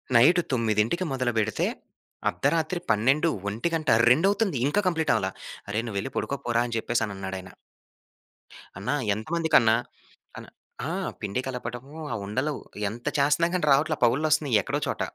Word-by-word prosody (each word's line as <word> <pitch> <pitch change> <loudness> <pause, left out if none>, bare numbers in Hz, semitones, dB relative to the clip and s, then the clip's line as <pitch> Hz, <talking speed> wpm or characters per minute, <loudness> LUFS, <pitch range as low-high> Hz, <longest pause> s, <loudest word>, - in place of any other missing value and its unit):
Night 155 +10 +6
9కి 115 - +1
మొదలు 130 -2 0
బెడితే 110 -1 +1 0.6
అద్దరాత్రి 165 +2 0
12 135 +10 +3 0.2
ఒంటిగంట, 155 +9 -1 0.2
రెండవుతుంది. 195 - +2
ఇంకా 175 +8 +1
కంప్లీటవల. 160 - +1 0.4
"అరె 105 +2 0
నువ్వెళ్లి 100 +3 -3
పడుకో 140 - -2
పోరా!" 120 0 +2
అని 120 - -5
జెప్పేసని 115 -2 -1
అన్నాడాయన. 95 -1 -6 1.3
అన్నా! 100 +9 -1 0.2
ఎంతమందికన్నా! 150 -2 +3 0.6
అన్ - - -11 0.4
ఆ! - - -2 0.3
పిండి 105 +5 -2
కలపటము, 125 +2 -6 0.2
ఆ - - -1
ఉండలు 130 +9 -1 0.4
ఎంత 120 +2 -10
చేస్తన్నా 150 +4 +3
గాని 175 -4 0
రావట్ల. 150 +2 +2
పగుళ్ళొస్తున్నాయి 145 -1 +2
ఎక్కడో - - -2
చోట. - - -3
130 Hz, 125 wpm, -26 LUFS, 110-155 Hz, 1.3 s, Night